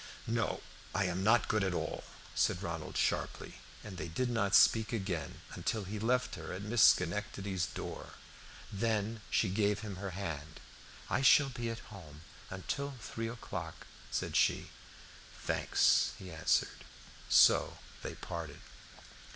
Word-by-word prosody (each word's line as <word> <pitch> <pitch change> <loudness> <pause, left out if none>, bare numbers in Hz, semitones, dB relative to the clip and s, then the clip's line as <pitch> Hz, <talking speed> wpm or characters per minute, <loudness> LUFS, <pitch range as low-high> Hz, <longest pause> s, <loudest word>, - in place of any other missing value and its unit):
"No, 115 -1 -1 0.3
I 100 - +2
am 90 +1 -1
not 110 +2 +4
good 110 -2 +1
at 95 -2 0
all," - - -3 0.3
said - - +1
Ronald - - -4
sharply, - - -1 0.2
and 100 -4 -8
they 80 - -4
did 120 +10 -1
not 100 -4 +2
speak 110 +2 +5
again 95 -8 -3
until 110 - -2
he 105 +3 -5
left 125 +3 +1
her 80 -2 -6
at 95 +2 -5
Miss 115 +2 +1
Schenectady's 95 0 +3
door. - - -7 0.6
Then 110 +1 -1
she 110 - +2
gave 100 +1 +1
him 105 -4 -6
her 100 +1 -4
hand. 80 -5 -5 0.5
"I - - 0
shall 135 +2 +6
be 120 -3 -4
at 115 -1 -7
home 75 -6 -11 0.3
until 140 +9 -4
three 115 0 -4
o'clock," 95 -8 -6 0.2
said - - -2
she. - - +2 0.7
"Thanks," - - +3
he 95 -2 -9
answered; 80 0 +1 0.5
so - - +6 0.2
they - - -5
parted. 80 -4 -6
100 Hz, 145 wpm, -33 LUFS, 90-115 Hz, 0.7 s, shall